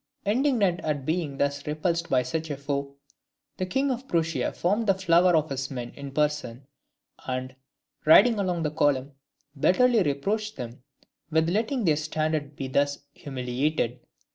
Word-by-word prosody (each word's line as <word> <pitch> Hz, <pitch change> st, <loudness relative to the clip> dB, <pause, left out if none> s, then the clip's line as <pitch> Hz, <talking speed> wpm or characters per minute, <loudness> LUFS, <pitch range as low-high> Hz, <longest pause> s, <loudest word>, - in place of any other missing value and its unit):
Indignant 215 Hz, -5 st, +2 dB
at 145 Hz, -3 st, -2 dB
being 155 Hz, -3 st, -1 dB
thus 140 Hz, +1 st, -1 dB
repulsed 170 Hz, +2 st, -1 dB
by 125 Hz, -1 st, +3 dB
such 160 Hz, +6 st, -3 dB
a 145 Hz, -, -3 dB
foe, 140 Hz, 0 st, -3 dB, 0.6 s
the 185 Hz, -, -2 dB
King 270 Hz, +7 st, +1 dB
of 255 Hz, +1 st, -4 dB
Prussia 165 Hz, -1 st, 0 dB
formed 210 Hz, +6 st, 0 dB
the 195 Hz, -, +4 dB
flower 180 Hz, -1 st, +4 dB
of 155 Hz, -2 st, +1 dB
his 135 Hz, 0 st, -3 dB
men 120 Hz, -3 st, -5 dB
in 140 Hz, -1 st, -8 dB
person, 140 Hz, -3 st, -1 dB, 0.6 s
and, 130 Hz, 0 st, -3 dB, 0.5 s
riding 210 Hz, +8 st, +6 dB
along 180 Hz, -4 st, -1 dB
the 150 Hz, -, -1 dB
column, 145 Hz, -3 st, +1 dB, 0.5 s
bitterly 240 Hz, -, +4 dB
reproached 205 Hz, +9 st, -1 dB
them 120 Hz, 0 st, -7 dB, 0.5 s
with 160 Hz, +1 st, +2 dB
letting 225 Hz, +4 st, 0 dB
their 155 Hz, -3 st, +3 dB
standard 155 Hz, -1 st, -2 dB
be 135 Hz, -, -4 dB
thus 140 Hz, +2 st, +1 dB, 0.2 s
humiliated. 130 Hz, -1 st, -2 dB
155 Hz, 150 wpm, -26 LUFS, 140-185 Hz, 0.6 s, riding